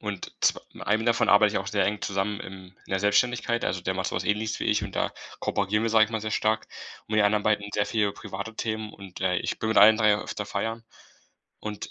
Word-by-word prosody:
und 105 -4 -5
zw - - +3
mit - - -10
einem 110 +2 +1
davon 115 -1 +2
arbeite 105 0 +6
ich - - +2
auch 100 0 -5
sehr 100 -1 +1
eng 105 0 -2
zusammen 100 +1 -2
im 95 -1 -9 0.2
in - - -15
der 95 - +1
Selbstständigkeit. 120 +3 +1
Also, 90 0 -1
der 95 0 -1
macht 95 0 -2
so - - -4
was 90 - -2
Ähnliches 110 +3 -1
wie - - -3
ich - - +2
und - - -6
da - - 0 0.3
kooperieren 105 +2 0
wir, 115 - 0
sage 110 -1 +5
ich - - -14
mal, 110 -1 -2
sehr 110 0 -4
stark. 110 0 0 0.4
Und - - -20
mit 110 - +2
den 105 - +5
anderen 105 0 +1
beiden 105 -1 +1
sehr 105 - +1
viel 110 -2 0
über 100 - -1
private 105 +2 -7
Themen 110 -1 -3
und, 95 -2 -11
äh, 95 -1 +1
ich - - -3
bin 110 - -1
mit 110 - +3
allen 110 +2 +8
3 105 -2 +4
öfter 105 - -5
feiern. 115 +3 -3 0.8
Und, 105 -1 -6
105 Hz, 260 wpm, -26 LUFS, 100-110 Hz, 0.8 s, allen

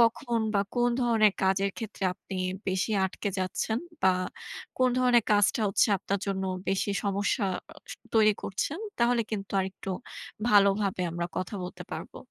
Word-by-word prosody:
কখন 235 +1 +2 0.2
বা 200 - +4 0.2
কোন 245 0 +3
ধরনের 220 -4 +4
কাজের 195 +1 +2
ক্ষেত্রে 215 -4 -5
আপনি 195 - -9 0.3
বেশি 190 +4 0
আটকে 190 +2 -3
যাচ্ছেন 190 +4 -1 0.2
বা 190 - +6 0.7
কোন 255 - +5
ধরনের 245 -3 +4
কাজটা 205 +3 +3
হচ্ছে 195 - +3
আপনার 200 +2 -2
জন্য 190 -1 -1 0.2
বেশি 195 +1 +1
সমস্যা 200 +2 0 0.3
আস - - -11 0.2
তৈরি 215 -1 +6
করছেন? 280 - -2 0.2
তাহলে 235 0 +3
কিন্তু 200 -3 -4
আরেকটু 190 +1 -5 0.6
ভালোভাবে 200 -2 +4
আমরা 170 0 -2
কথা 185 +3 -4
বলতে 180 - -7
পারবো। - - -7
200 Hz, 145 wpm, -28 LUFS, 190-230 Hz, 0.7 s, বা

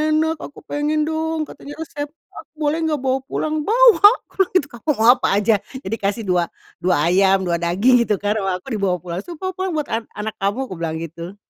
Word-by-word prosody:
enak 320 0 +1
aku - - -9
pengen 300 +1 0
dong," 320 0 -1
katanya 290 - -10
"resepnya 295 0 -8
aku - - -14
boleh 305 +1 0
enggak 310 -3 0
bawa 265 0 +1
pulang?" 310 +1 -2
Bawa. 470 -2 +7 0.2
Bilang 385 -2 +1
gitu 295 -6 +3
ke - - -10
aku, 305 - 0
"Mau 225 0 +2
apa - - +1
aja? 210 0 +3 0.2
Nih 190 - -6
dikasih," 220 0 -1
dua 175 -2 +2 0.3
"dua 180 0 +2
ayam, 190 +2 +4
2 170 -1 0
daging." 205 +9 +3
Gitu 210 - +2
kan, 205 +1 0
"Wah 190 -2 -1
aku 270 - -9
dibawa 190 -2 +1
pulang." 175 0 -4
Terus, 335 - -8
"pulang 375 0 -2
pulang 375 0 -2
buat 300 -2 -1
an 225 +1 -1
anak 215 +1 -4
kamu." 200 +7 0
Aku 185 - -7
bilang 165 -1 -2
gitu. 170 +3 -7
235 Hz, 220 wpm, -20 LUFS, 190-310 Hz, 0.3 s, Bawa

